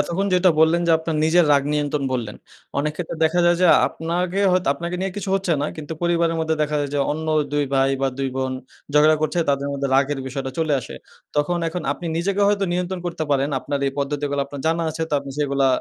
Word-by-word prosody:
এতক্ষণ 190 +4 -1
যেটা 180 0 +5
বললেন 165 +2 +4
যে 170 - +4
আপনার 160 -1 -3
নিজের 170 +2 +4
রাগ 140 -1 +4
নিয়ন্ত্রণ 145 -1 -1
বললেন। 115 -5 -3 0.4
অনেক 150 +2 0
ক্ষেত্রে 170 -1 -5
দেখা 170 +3 +2
যায় 175 0 +4
যে, 180 - +5 0.2
আপনাকে 175 +3 -2
হয়তো 180 -3 +1
আপনাকে 170 +4 -4
নিয়ে 195 +1 -1
কিছু 200 -1 -4
হচ্ছে 195 -3 0
না। 145 - 0
কিন্তু 155 0 -6
পরিবারের 170 -1 +1
মধ্যে 160 0 0
দেখা 150 0 -1
যায় 145 - -3
যে, - - +1
অন্য 160 +1 -5 0.3
২ 145 0 +1
ভাই 135 0 +3
বা 135 - +3
২ 135 -1 0
বোন 130 0 -1 0.4
ঝগড়া 155 +1 +6
করছে, 155 +3 0
তাদের 140 0 -1
মধ্যে 140 0 -2
রাগের 140 +1 +2
বিষয়টা 135 0 -4
চলে 160 -2 +1
আসে। - - -9 0.4
তখন 160 +4 +1
এখন 175 +2 -4
আপনি 175 - -8
নিজেকে 195 +4 0
হয়তো 200 -1 +1
নিয়ন্ত্রণ 180 +1 -2
করতে 170 -2 -3
পারেন। 140 0 +2
আপনার 140 +1 -3
এই 135 - -1
পদ্ধতিগুলা 145 0 -1
আপনার 140 0 -8
জানা 165 +1 +1
আছে, 160 +1 -4
তো - - -10
আপনি 140 0 -9
সেগুলা 140 -2 +1
155 Hz, 220 wpm, -22 LUFS, 140-175 Hz, 0.4 s, ঝগড়া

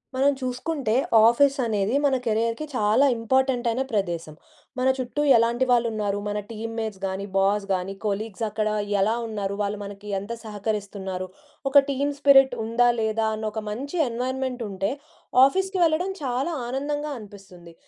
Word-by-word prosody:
మనం 275 +2 +4
చూసుకుంటే, 255 -1 -2 0.3
ఆఫీస్ 275 +4 +4
అనేది 215 +2 0
మన 275 - +3
కెరియర్‌కి 230 +5 0
చాలా 215 +4 +3
ఇంపార్టెంట్ 260 +1 +1
అయిన 235 +3 -1
ప్రదేశం‌. 170 -7 -2 0.4
మన 255 - +2
చుట్టూ 255 +3 -3 0.2
ఎలాంటి 235 +2 +2
వాళ్ళు 240 -1 +4
ఉన్నారు, 205 -2 -1
మన 205 0 -2
టీమ్‌మేట్స్ 220 -2 -5
గానీ, 190 +1 -3
బాస్ 200 +1 +2
గానీ, 185 +1 -2
కొలీగ్స్ 210 +1 -3
అక్కడ 215 0 -1 0.3
ఎలా 215 +3 +2
ఉన్నారు, 200 -3 -3
వాళ్ళు 205 +1 -1
మనకి 205 +1 -9
ఎంత 200 +4 -8
సహకరిస్తున్నారు, 200 -3 -4 0.4
ఒక 280 +1 +8
టీమ్ 280 +1 0
స్పిరిట్ 270 -2 +6
ఉందా, 240 +2 +3
లేదా 220 0 0
అని 220 0 -3
ఒక 220 +1 -4
మంచి 275 +11 -5
ఎన్విరాన్మెంట్ 255 +1 -3
ఉంటే, 195 +1 -2 0.5
ఆఫీస్‌కి 380 +6 0
వెళ్ళడం 335 +4 +1
చాలా 260 +5 -1 0.2
ఆనందంగా 290 +3 -3
అనిపిస్తుంది. 195 -5 -13
225 Hz, 145 wpm, -24 LUFS, 205-265 Hz, 0.5 s, ఒక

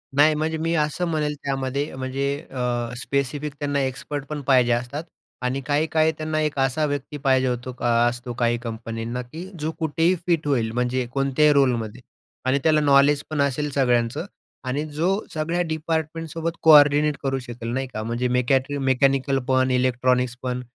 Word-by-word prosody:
नाही, 150 +2 +6
म्हणजे 160 +1 -1
मी 165 +1 -1
असं 155 +3 0
म्हणेल 155 -2 -1
त्यामध्ये 135 +1 -2
म्हणजे 130 +1 -3 0.3
अ, 120 -2 -2
स्पेसिफिक 140 +2 -2
त्यांना 145 -1 -1
एक्सपर्ट 135 +2 -4
पण 150 -1 -4
पाहिजे 125 -3 +4
असतात 125 +6 -3 0.4
आणि 130 +2 -1
काही-काही 155 +2 +2
त्यांना 155 0 -2
एक 150 -2 -1
असा 135 +3 +1
व्यक्ती 145 0 -4
पाहिजे 130 -2 +2
होतो 125 0 -3
अ, - - -3 0.2
असतो 120 0 -6
काही 120 0 +2
कंपनींना, 115 +1 -4
की 155 +9 -9
जो 155 +2 -2
कुठेही 165 +3 +2
फिट 165 -4 +1
होईल 120 -6 +1
म्हणजे 125 +1 -1
कोणत्याही 140 +2 +3
रोलमध्ये 125 -5 +1 0.4
आणि 130 +2 +2
त्याला 155 -1 +4
नॉलेज 140 0 +4
पण 155 -2 0
असेल 140 +1 0
सगळ्यांचं 125 +2 +1 0.4
आणि 140 +4 -1
जो 155 +4 -1 0.2
सगळ्या 165 +3 -1
डिपार्टमेंटसोबत 160 +1 -3
कोऑर्डिनेट 150 -1 +6
करू 135 -1 0
शकेल, 120 -2 -7
नाही 135 +1 -2
का. 110 -4 -5
म्हणजे 120 +3 -1
मेकॅट्री 130 +3 +1
मेकॅनिकल 135 0 +2
पण, 130 -1 +2
इलेक्ट्रॉनिक्स 125 0 +1
पण 125 0 -2
135 Hz, 160 wpm, -23 LUFS, 125-150 Hz, 0.4 s, नाही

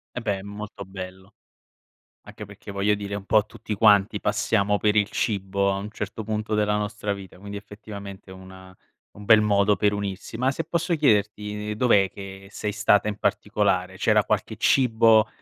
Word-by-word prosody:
Eh, - - -2
beh, 105 -4 -1
è - - -9
molto 105 0 -8
bello! 95 0 -9 0.9
Anche - - -10
perché - - -12
voglio 100 +1 +1
dire 100 -1 -5
un 100 - -5
po' 110 +1 +3
tutti 105 - -6
quanti 105 0 +4
passiamo 105 0 +1
per 105 0 +2
il 105 -1 +3
cibo, 100 -1 0
a - - -2
un 100 +2 -6
certo 105 +1 -5
punto 110 0 -3
della 105 0 +1
nostra 105 0 -2
vita, 95 -2 -11
quindi 100 +1 -8
effettivamente 100 -2 -10
una 95 0 -13 0.4
un 105 - -12
bel 110 0 +7
modo 105 -1 +3
per 105 0 +1
unirsi. 100 +1 -5
Ma 130 +3 +1
se - - -3
posso 170 +2 -1
chiederti, 105 -6 0
ehm, - - -1
dov'è 105 -4 +3
che 95 0 -10
sei 105 0 -4
stata 105 0 +2
in 105 - -3
particolare? 100 -3 0
C'era - - +3
qualche - - -2
cibo, 115 -4 +4
105 Hz, 180 wpm, -24 LUFS, 100-105 Hz, 0.9 s, bel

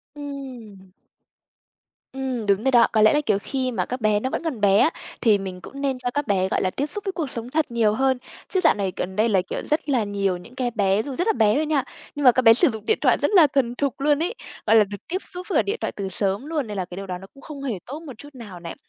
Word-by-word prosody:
Ừm. 255 -10 -9 1.2
Ừm, 260 -4 -3
đúng 200 +1 +2
rồi 265 - +2
đó. 240 -2 +6
Có 220 - +3
lẽ 215 - +6
là, 295 - +3
kiểu, 210 -3 +2
khi 260 +3 -2
mà 235 - -1
các 250 0 -5
bé 215 -1 +3
nó 260 - -2
vẫn - - -3
còn 275 -10 -3
bé 200 -1 +5
á, - - +5 0.3
thì 215 -3 +5
mình 185 -2 -7
cũng 275 - -9
nên 270 -2 0
cho 245 -1 -2
các 290 +1 -2
bé, 190 -3 +2
gọi - - 0
là, 185 - +1
tiếp 270 +10 -2
xúc 400 +7 -6
với 390 - -1
cuộc 320 -7 -3
sống 235 0 -5
thật 305 -2 0
nhiều 225 -3 +2
hơn. 265 +3 +2 0.3
Chứ 375 - 0
dạo - - +6
này 195 -2 -2
gần 190 +1 -4
đây 215 +3 +2
là, 195 -4 +3
kiểu, - - -3
rất 305 0 0
là 255 -5 +2
nhiều 200 -3 -1
những 230 +8 -14
cái 250 -2 -1
bé 200 -2 +2
dù 275 +1 -6
rất 355 - -1
là 445 - +4
bé 215 - +3
thôi 310 - +1
nha, 300 -3 +1 0.3
nhưng 290 - -3
mà 250 - +8
các 255 - +1
bé 225 -2 +8
sử 310 +8 +4
dụng 220 -3 -7
điện 440 - +2
thoại - - +4
rất - - +1
là 355 -7 +7
thuần 255 -3 0
thục 275 0 -2
luôn 295 +2 +2
ấy, 405 +7 -2 0.3
gọi 220 - +5
là, 220 - +7
được 205 0 -7
tiếp 370 +3 -3
xúc 360 0 -7
với 335 - +2
cả - - +5
điện 415 +3 -2
thoại - - -1
từ 195 -1 -5
sớm 195 +5 -1
luôn, 300 -5 -2
nên 210 -1 -5
là 185 - -2
cái 175 - -10
điều 195 +1 -7
đó 180 -1 -4
nó 190 +2 -12
cũng 275 - -16
không 285 -3 -8
hề 255 -6 -2
tốt 285 +5 -7
một 305 -5 -9
chút 290 - -11
nào 210 -8 -9
này. 170 -1 -7
245 Hz, 300 wpm, -23 LUFS, 205-285 Hz, 1.2 s, mà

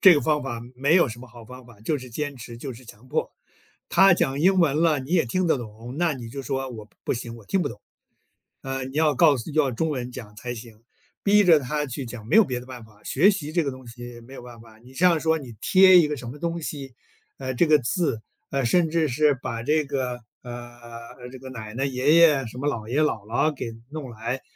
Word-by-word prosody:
这 190 -3 +9
个 145 - +2
方 150 -1 +1
法 120 -4 -4 0.2
没 140 +5 +3
有 175 -6 +5
什 120 0 -8
么 130 - -11
好 120 -1 -13
方 125 +2 -12
法， 115 -4 -17
就 145 +7 -1
是 130 -1 -10
坚 145 +3 -4
持， 120 -1 -9
就 130 +2 -6
是 125 +2 -13
强 120 +2 -15
迫。 - - -1 0.6
他 195 -1 +6
讲 140 -4 0
英 190 +2 +4
文 155 -4 +3
了， 160 -4 +3
你 130 +3 -9
也 170 -6 +4
听 180 +10 0
得 160 - +2
懂， 115 +1 -9
那 170 -2 +2
你 120 -4 -7
就 135 +3 -6
说 135 +1 -3
“我 110 -3 -9 0.2
不 - - 0
行， 120 -1 -5
我 115 - -14
听 190 - 0
不 145 - 0
懂。 - - -10 0.8
呃， 135 -1 -4
你 135 +3 -6
要 155 -1 +3
告 150 +1 +5
诉 120 +7 -6
要 145 -3 +2
中 160 +7 -1
文 125 -4 -3
讲 105 -4 -9
才 120 +4 -5
行”。 115 -1 -12 0.4
逼 205 +1 +5
着 170 -3 +7
他 150 +3 -2
去 135 0 -5
讲， 115 -2 -8
没 - - +2
有 225 - +8
别 125 -6 -3
的 125 - -11
办 125 -2 -9
法， 105 -1 -19
学 185 +10 +4
习 155 -6 -4
这 170 -1 +2
个 140 - -2
东 130 -1 -12
西 120 0 -9
没 130 +4 -14
有 - - -9
办 120 -1 -12
法。 110 -1 -17
你 125 +3 -17
像 170 +3 +4
说 160 0 +2
你 130 -6 -9
贴 185 -1 +7
一 165 - +4
个 150 - -3
什 125 -2 -7
么 135 - -8
东 170 +2 -3
西， 135 -5 -6 0.4
呃， 130 -1 -4
这 150 +7 +3
个 155 -1 +5
字， 130 -3 -1 0.3
呃， 135 -2 0
甚 165 +5 +3
至 160 -1 +1
是 145 +3 +3
把 120 -3 -5
这 155 +3 +2
个 125 -3 -3 0.2
呃， 120 0 -10
这 130 - -10
个 130 - -9
奶 110 -4 -8
奶、 135 +2 0
爷 135 +3 +2
爷， 150 -6 +6
什 115 +3 -9
么 145 - -2
姥 115 -6 -3
爷、 145 +5 +1
姥 110 -9 0
姥 120 +8 +1
给 120 -4 -6 0.2
弄 150 -4 -6
来， 115 +3 -4
130 Hz, 270 characters per minute, -24 LUFS, 120-155 Hz, 0.8 s, 这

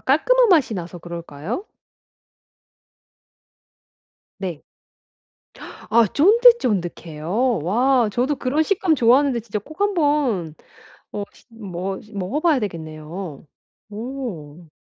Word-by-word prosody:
깔끔한 485 - +3
맛이 305 - +4
나서 175 -1 -6
그럴까요? 170 - -6 2.7
네. 180 -6 -5 1.3
아 230 +1 +5
쫀득쫀득해요? 230 - +2
와 240 - +2
저도 255 +7 0
그런 275 +4 0
식감 370 -1 +1
좋아하는데 255 0 +3
진짜 220 -1 -4
꼭 310 - -14
한번 290 - +1 0.6
어 205 - -4
시 - - -22
머 195 -4 -5 0.2
먹어봐야 280 - +1
되겠네요. 160 -3 -6 0.5
오. 205 - -7
225 Hz, 195 characters per minute, -22 LUFS, 175-290 Hz, 2.7 s, 아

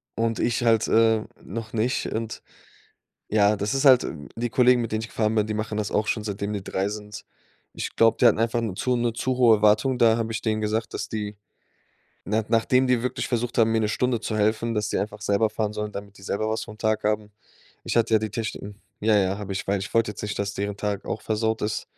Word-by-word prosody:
und 115 0 -1
ich 120 0 0
halt, 115 -2 +3
äh, 110 -1 +3 0.2
noch 115 -1 -7
nicht. 115 +3 0
Und 110 0 -4 0.9
ja, 105 0 +4
das 100 +1 -1
ist 135 - 0
halt 130 -3 +7 0.3
die 120 +1 -2
Kollegen, 125 +1 +4
mit 115 - -4
denen 110 - 0
ich - - -5
gefahren 110 -1 0
bin, 105 -1 +2
die 110 - -2
machen 110 0 -3
das 105 -1 -2
auch 105 0 0
schon, 110 - -1
seitdem 100 0 -3
die 100 -2 -4
3 95 +1 -1
sind. 105 0 -8 0.5
Ich - - -4
glaube, 115 0 +4
die - - +6
hatten 110 - +3
einfach 115 +1 +1
'ne 110 -4 -2
zu 125 +5 0
'ne 120 -1 0
zu 125 +2 -2
hohe 120 -3 +6
Erwartung, 110 +5 +3
da 115 -2 +4
habe 115 -1 -2
ich - - -3
denen 110 -1 0
gesagt, 110 +1 -2
dass - - -4
die 105 -1 -4 0.9
na 110 +3 0
nachdem 120 +3 +3
die 125 -2 +2
wirklich 125 +1 -2
versucht 120 0 -2
haben, 115 -1 +4
mir 115 - +2
'ne 105 - +1
Stunde 120 +2 0
zu 110 -1 -3
helfen, 110 +2 +1
dass 105 -1 -1
sie - - -1
einfach 105 +1 -4
selber 105 +2 +2
fahren 105 -1 -2
sollen, 105 0 -4
damit 100 0 -8
die - - -16
selber 100 +3 -2
was 110 - -2
vom 105 -1 -12
Tag 110 -1 0
haben. 105 0 -1 0.5
Ich - - -2
hatte 115 -1 +3
ja 110 - +4
die 110 -1 -3
Techniken 105 -1 -5 0.2
ja, 110 0 +3
ja, 95 0 0
habe 100 -2 -5
ich, 95 - -4
weil 100 0 +1
ich 95 - -6
wollte 115 -2 +2
jetzt 100 - -9
nicht, 105 0 -4
dass 100 0 -2
deren 100 0 -3
Tag 100 -1 -3
auch - - -3
versaut 110 0 -1
ist. 105 0 -2
110 Hz, 245 wpm, -25 LUFS, 105-115 Hz, 0.9 s, halt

